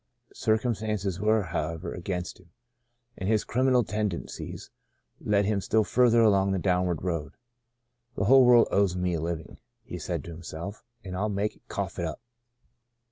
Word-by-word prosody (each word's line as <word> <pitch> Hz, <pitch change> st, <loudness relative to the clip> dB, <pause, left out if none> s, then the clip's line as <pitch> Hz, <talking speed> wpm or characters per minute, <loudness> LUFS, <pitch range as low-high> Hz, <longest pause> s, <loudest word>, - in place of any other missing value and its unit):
Circumstances 110 Hz, -4 st, -1 dB
were, 110 Hz, +1 st, +2 dB
how 85 Hz, -2 st, -2 dB
ever, 85 Hz, +2 st, -6 dB
against 90 Hz, -1 st, -4 dB
him, 90 Hz, -2 st, -21 dB, 0.7 s
and 95 Hz, -, -3 dB
his 110 Hz, -2 st, +2 dB
criminal 130 Hz, 0 st, +2 dB
tenden 105 Hz, -4 st, -2 dB
cies -, -, -8 dB, 0.5 s
led 100 Hz, -1 st, +1 dB
him 100 Hz, -1 st, 0 dB
still 110 Hz, +3 st, +2 dB
further 120 Hz, 0 st, +4 dB
along 100 Hz, -3 st, +4 dB
the -, -, +1 dB
downward 90 Hz, -3 st, 0 dB
road. 85 Hz, -4 st, -3 dB, 0.4 s
" 120 Hz, 0 st, -48 dB
The -, -, 0 dB
whole 130 Hz, +4 st, +7 dB
world 120 Hz, -1 st, +6 dB
owes 100 Hz, -3 st, +2 dB
me 90 Hz, -1 st, 0 dB
a 80 Hz, -, -1 dB
living," 80 Hz, -1 st, -5 dB, 0.2 s
he -, -, -7 dB
said -, -, -3 dB
to 85 Hz, -, -8 dB
himself, 85 Hz, +6 st, -7 dB
" 120 Hz, -, -44 dB
and 95 Hz, -2 st, -6 dB
I'll 105 Hz, +4 st, -1 dB
make 105 Hz, +1 st, -1 dB
it -, -, -30 dB
' -, -, -46 dB
cough 95 Hz, -2 st, -4 dB
up.' 80 Hz, -3 st, -3 dB
100 Hz, 180 wpm, -27 LUFS, 90-110 Hz, 0.7 s, whole